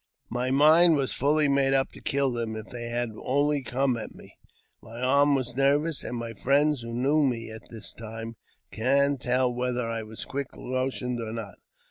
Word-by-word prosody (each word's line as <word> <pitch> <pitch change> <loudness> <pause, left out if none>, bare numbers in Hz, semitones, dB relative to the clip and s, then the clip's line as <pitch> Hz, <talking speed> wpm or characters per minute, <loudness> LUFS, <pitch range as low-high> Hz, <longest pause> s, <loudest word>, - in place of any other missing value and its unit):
My 125 +2 -1
mind 155 +5 +6
was 140 -3 0
fully 150 +2 +2
made 140 -1 +2
up 135 0 +1
to - - -13
kill 140 -1 +1
them 115 -2 -3
if 110 0 -8
they 120 -1 -5
had 120 -1 -1
only 145 +2 +1
come 130 0 0
at 110 - -7
me; - - -15 0.5
my 115 +2 -10
arm 140 +3 +4
was 125 -3 -2
nervous; 145 +3 +2
and 120 - -4
my 115 -1 -5
friends, 140 +4 +2
who 115 0 -7
knew 135 +6 +2
me 120 -5 -1
at 110 - -10
that 115 -2 -7
time, 115 0 -7 0.4
can 140 +4 +2
tell 125 0 +1
whether 125 -1 -1
I 115 0 -3
was 110 0 -8
quick 140 -1 -5
motioned 130 -1 -2
or 110 -1 -5
not. 110 -3 -7
125 Hz, 190 wpm, -27 LUFS, 115-140 Hz, 0.5 s, mind